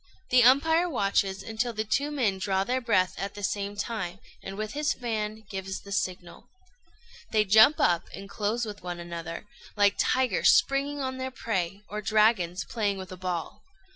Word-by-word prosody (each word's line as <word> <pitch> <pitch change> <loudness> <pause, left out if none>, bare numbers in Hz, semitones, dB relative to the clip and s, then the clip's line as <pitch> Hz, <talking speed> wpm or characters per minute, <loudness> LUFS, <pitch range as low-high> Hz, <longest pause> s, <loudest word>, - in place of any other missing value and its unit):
The 250 0 +6
umpire 320 +8 +4
watches 195 - 0
until 225 +2 -2
the 215 0 -2
two 270 +7 0
men 235 -10 0
draw 190 0 0
their 255 +5 -1
breath 195 -6 +2
at 200 +1 -4
the 205 - -8
same 200 0 -2
time, 205 -5 -4 0.2
and 195 0 -7
with 215 0 -4
his 295 +1 0
fan 220 -2 -4
gives 190 -1 -5
the 200 - -12
signal. 180 -3 -4 0.8
They 215 -1 +2
jump 220 +9 +6
up 170 -1 +2
and 195 0 -9
close 215 +4 -2
with 210 -1 -8
one 175 -1 -5
another, 170 +1 -6 0.3
like 205 0 +4
tigers 255 -6 +3
springing 280 +1 +1
on 260 -1 -3
their 260 0 -3
prey, 195 -6 -3
or 210 +1 -5
dragons 210 -5 +2
playing 205 -4 -1
with 190 -1 -8
a - - -6
ball. 180 -2 -4
210 Hz, 175 wpm, -27 LUFS, 190-240 Hz, 0.8 s, The